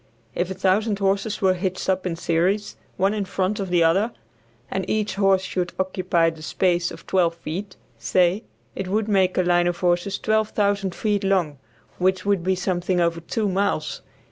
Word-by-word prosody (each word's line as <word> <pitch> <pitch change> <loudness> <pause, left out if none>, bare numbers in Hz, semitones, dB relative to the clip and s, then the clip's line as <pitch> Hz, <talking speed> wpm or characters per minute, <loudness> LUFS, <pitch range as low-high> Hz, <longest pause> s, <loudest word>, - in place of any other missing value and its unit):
If 175 +1 -1
1000 195 +3 +1
horses 200 +1 -1
were 190 -1 +5
hitched 185 0 -3
up 190 -1 0
in 170 - -2
series, 180 +5 0 0.2
one 195 +2 +2
in 210 -1 -1
front 195 +1 -1
of 195 -2 -3
the 175 -1 +3
other, 195 +8 +3 0.6
and 190 - -1
each 215 -1 0
horse 195 -1 +3
should 180 -2 -3
occupy 185 -3 +1
the 160 -1 -13
space 175 +1 +1
of - - -11
twelve 175 -3 +2
feet, 180 +4 -6 0.2
say, 175 - +2 0.3
it 190 - -4
would 210 +3 0
make 190 -3 +2
a 185 - +4
line 175 0 +3
of 175 -1 -1
horses 180 +2 0
12,000 205 -3 0
feet 210 -2 0
long, 180 -8 +1 0.4
which 185 +1 +1
would 200 -4 +1
be 190 +1 +1
something 180 -1 -1
over 170 -1 +1
two 210 +6 -2
miles. 190 -5 -1
185 Hz, 175 wpm, -23 LUFS, 175-200 Hz, 0.6 s, were